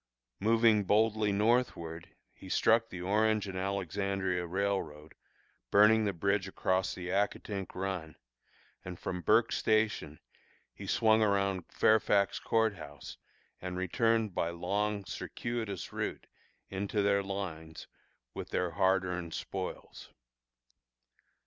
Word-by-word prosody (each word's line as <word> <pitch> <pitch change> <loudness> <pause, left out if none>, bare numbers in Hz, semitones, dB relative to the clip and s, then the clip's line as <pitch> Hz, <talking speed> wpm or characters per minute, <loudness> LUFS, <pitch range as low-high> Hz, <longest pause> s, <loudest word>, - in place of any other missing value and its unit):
Moving 110 0 +4
boldly 105 +1 +2
northward, 100 -6 0 0.2
he 95 - -12
struck 115 +4 +3
the 90 -1 -7
Orange 105 +2 +2
and 95 - -6
Alexandria 95 -1 -2
Railroad, 85 -5 -2 0.6
burning 105 - +5
the 100 - +1
bridge 100 +2 0
across 95 -1 0
the 90 -1 -6
Accotink 100 0 -2
Run, 90 -4 -4 0.7
and 90 -1 -7
from 90 +1 -4
Burke's - - +3
Station 110 -9 0 0.5
he - - -9
swung 110 0 +3
around 100 -4 +1
Fairfax 100 -2 +3
Court 110 -3 +1
House, 75 0 -10 0.4
and 90 0 -4
returned, 110 +3 +1
by 85 - 0
long, 100 +4 -2
circuitous 110 -4 -5
route, - - -3 0.5
into 100 +2 -1
their 100 0 +3
lines 90 -5 -6 0.5
with - - -6
their 90 -1 -1
hard 95 +2 +2
earned 90 -2 -4
spoils. - - -6
100 Hz, 115 wpm, -31 LUFS, 90-105 Hz, 0.7 s, burning